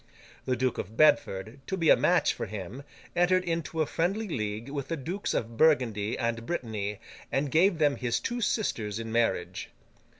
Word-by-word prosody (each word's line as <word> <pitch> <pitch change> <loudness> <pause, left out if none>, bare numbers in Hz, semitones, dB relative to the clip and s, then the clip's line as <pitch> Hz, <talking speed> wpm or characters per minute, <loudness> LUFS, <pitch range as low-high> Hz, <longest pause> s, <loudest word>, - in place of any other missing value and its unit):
The 130 - +1
Duke 130 0 0
of 110 - -6
Bedford, 115 -6 +3
to 190 - -2
be 165 -3 +4
a - - +9
match - - +3
for - - -5
him, 105 +5 -6 0.3
entered 180 +1 +3
into 165 -2 -1
a - - -2
friendly 195 +9 -1
league 110 - -3
with 140 -1 -4
the 165 - -2
Dukes 175 +9 -3
of 115 0 -3
Burgundy 120 -9 +3
and 115 0 -1
Brittany, 105 - -3 0.3
and 135 0 0
gave 175 +3 +4
them 145 -3 +2
his 120 -2 0
two 240 0 -3
sisters 110 - -1
in 115 0 -5
marriage. 115 0 0
135 Hz, 175 wpm, -28 LUFS, 115-165 Hz, 0.3 s, a